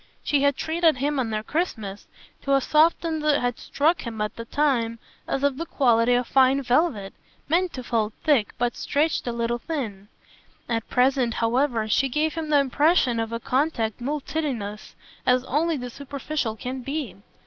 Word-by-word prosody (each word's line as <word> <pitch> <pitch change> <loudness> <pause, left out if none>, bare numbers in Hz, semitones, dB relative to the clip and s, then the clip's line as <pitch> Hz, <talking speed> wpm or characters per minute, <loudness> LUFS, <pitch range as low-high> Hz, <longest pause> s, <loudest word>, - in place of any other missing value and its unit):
She 285 -2 +1
had 280 -1 +3
treated 320 -2 +2
him 285 +2 0
on 240 -3 -1
their 215 -1 -2
Christmas 220 - -3 0.3
to 275 0 +2
a - - +4
softness 320 +2 +2
that 300 -1 +3
had 245 -1 -2
struck 315 +4 +1
him 230 -2 -6
at 210 0 -2
the 230 - -7
time 235 -4 0 0.3
as 270 - -2
of 285 -2 +1
the 330 - -3
quality 240 -4 +3
of 245 0 +1
fine 265 +2 +3
velvet, 245 - +1 0.3
meant 345 +4 +2
to 255 - -6
fold 225 -3 -1
thick, 280 -9 +2
but 245 0 0
stretched 295 -2 0
a - - 0
little 235 0 -1
thin; 225 - -5 0.6
at 230 -1 -2
present, 250 -2 +2
however, 235 -1 +1
she 270 +5 +2
gave 300 +4 0
him 320 -2 -4
the 295 -1 +5
impression 280 -2 +2
of 225 0 -2
a 230 - -3
contact 250 -4 -1
multitudinous 270 -6 -4 0.3
as 250 0 +3
only 310 +4 0
the 250 -1 -6
superficial 280 -3 -4
can 255 +4 -5
be. 275 -3 -4
260 Hz, 175 wpm, -24 LUFS, 230-300 Hz, 0.6 s, the